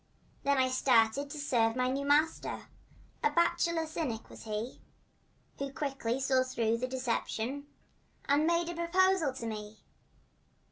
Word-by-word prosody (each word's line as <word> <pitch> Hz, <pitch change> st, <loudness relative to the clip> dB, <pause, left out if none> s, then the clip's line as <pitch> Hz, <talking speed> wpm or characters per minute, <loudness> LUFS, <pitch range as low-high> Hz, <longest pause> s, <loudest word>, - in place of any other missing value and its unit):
Then 280 Hz, 0 st, +2 dB
I 260 Hz, -1 st, +4 dB
started 255 Hz, +1 st, +3 dB
to 300 Hz, -, -7 dB
serve 235 Hz, -6 st, +2 dB
my 255 Hz, 0 st, +1 dB
new 275 Hz, +2 st, -1 dB
master— 300 Hz, +3 st, +1 dB, 0.5 s
A 450 Hz, -, +5 dB
bachelor 335 Hz, -2 st, +2 dB
cynic 305 Hz, -8 st, -4 dB
was -, -, -11 dB
he, 215 Hz, +3 st, -4 dB, 0.8 s
Who 275 Hz, 0 st, -3 dB
quickly 270 Hz, -4 st, -2 dB
saw 265 Hz, -1 st, +3 dB
through 230 Hz, -3 st, 0 dB
the 255 Hz, -, -1 dB
deception 255 Hz, +1 st, -2 dB, 0.6 s
And 290 Hz, +3 st, +3 dB
made 340 Hz, 0 st, +2 dB
a -, -, -3 dB
proposal 345 Hz, -2 st, +2 dB
to 240 Hz, -, -6 dB
me. 215 Hz, -1 st, -6 dB
270 Hz, 140 wpm, -31 LUFS, 235-310 Hz, 0.8 s, A